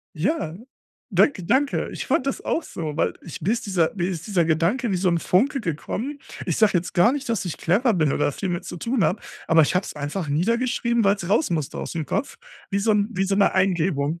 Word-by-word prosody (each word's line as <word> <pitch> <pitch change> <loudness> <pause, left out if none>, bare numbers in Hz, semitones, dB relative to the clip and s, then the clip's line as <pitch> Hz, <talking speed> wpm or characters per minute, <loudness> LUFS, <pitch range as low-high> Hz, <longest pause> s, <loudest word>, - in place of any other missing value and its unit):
Ja, 170 - -1 0.5
danke, 210 - +3
danke. 270 +9 +1
Ich - - -5
fand 265 - +1
das 275 - -1
auch 335 - 0
so, 155 -4 -5
weil - - +1
ich 165 - -8
mir 190 +8 +1
ist 240 - -2
dieser 175 -5 +1
mir 180 -3 -1
ist 170 -2 -5
dieser 185 -5 +2
Gedanke 170 +10 +1
wie 190 - +1
so 185 +1 +1
'n 170 -1 +2
Funke 270 +9 +2
gekommen. 225 - -4 0.3
Ich - - 0
sage 215 -2 +4
jetzt 175 +1 -2
gar 190 +7 +5
nicht, 285 -2 -4
dass 225 -5 -1
ich 175 - -4
clever 215 +8 +2
bin 155 -5 +2
oder 145 - +1
viel 190 - -4
mit 175 -1 -3
zu - - -7
tun 230 +5 0
habe, 195 - +1 0.3
aber 165 0 +5
ich 150 - +1
habe 190 - +1
es - - -7
einfach 150 +3 -4
niedergeschrieben, 235 - +1
weil's 195 -3 +1
raus 220 - +2
musste 155 -5 -2
ausm 160 -3 -4
Kopf, 285 - -2 0.3
wie 200 - +1
so 220 +2 +2
'n 205 -1 +2
wie 195 -1 0
so 195 0 0
'ne 200 - +4
Eingebung. 170 -4 +1
190 Hz, 230 wpm, -23 LUFS, 165-230 Hz, 0.5 s, gar